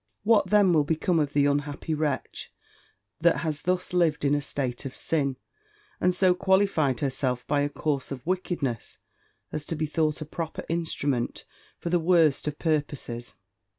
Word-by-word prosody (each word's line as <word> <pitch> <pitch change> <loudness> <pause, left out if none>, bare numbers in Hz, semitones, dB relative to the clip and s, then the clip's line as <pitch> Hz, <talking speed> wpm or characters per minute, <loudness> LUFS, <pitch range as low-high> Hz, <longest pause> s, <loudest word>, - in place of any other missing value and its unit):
What 215 -1 +4
then 205 -4 +5
will 155 -2 +4
become 160 +3 +1
of 145 -2 0
the 145 -1 +4
unhappy 145 +2 -1
wretch, 150 -2 -2 0.7
that 170 +1 +4
has 155 -3 -2
thus 180 0 -1
lived 165 -5 +2
in 140 - +3
a 145 - +2
state 130 -3 -3
of 135 - -6
sin, 140 -5 -1 0.6
and 180 0 +2
so 185 0 +4
qualified 185 -8 +2
herself 130 -2 -1
by 145 -1 +1
a 145 - +1
course 145 -2 -2
of 130 -2 -6
wickedness, 170 - -2 0.5
as 155 - -3
to 165 - -3
be 155 0 -1
thought 155 0 0
a 155 - -5
proper 160 +1 -5
instrument 145 -7 -1 0.3
for 170 - -4
the 175 - +3
worst 160 -4 +3
of 150 0 -2
purposes! 145 -7 -2
155 Hz, 165 wpm, -27 LUFS, 140-170 Hz, 0.7 s, then